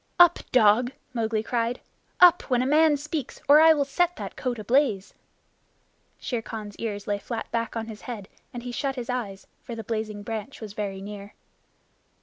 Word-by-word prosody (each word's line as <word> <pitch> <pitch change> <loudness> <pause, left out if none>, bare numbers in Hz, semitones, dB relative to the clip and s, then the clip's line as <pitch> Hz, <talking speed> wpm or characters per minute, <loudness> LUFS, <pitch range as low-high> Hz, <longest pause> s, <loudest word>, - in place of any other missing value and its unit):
"Up, 350 -1 +7
dog!" 240 +1 +4 0.2
Mowgli 225 -2 -1
cried. 235 +1 -1 0.4
"Up, 355 -1 +8
when 250 -1 +2
a - - -1
man 300 +2 +4
speaks, 295 -1 -5
or 295 +2 +8
I 320 0 +8
will 285 -2 +1
set 355 +5 +1
that - - -7
coat 250 -2 -3
ablaze!" 220 -2 +1 1.1
Shere 240 -3 -3
Khan's 210 -2 -7
ears 205 -3 -4
lay 205 -1 -1
flat 230 +1 -5
back 230 0 -2
on 225 -1 -2
his 220 -2 -9
head, 210 -5 -6 0.2
and 240 -1 -7
he 245 - -5
shut 270 +2 -2
his 245 -1 -4
eyes, 205 -6 -4 0.2
for 235 - -7
the 225 - -6
blazing 215 -1 -4
branch 225 +4 -6
was 215 -3 -8
very 200 -2 -4
near. 205 0 -9
230 Hz, 180 wpm, -26 LUFS, 210-270 Hz, 1.1 s, Up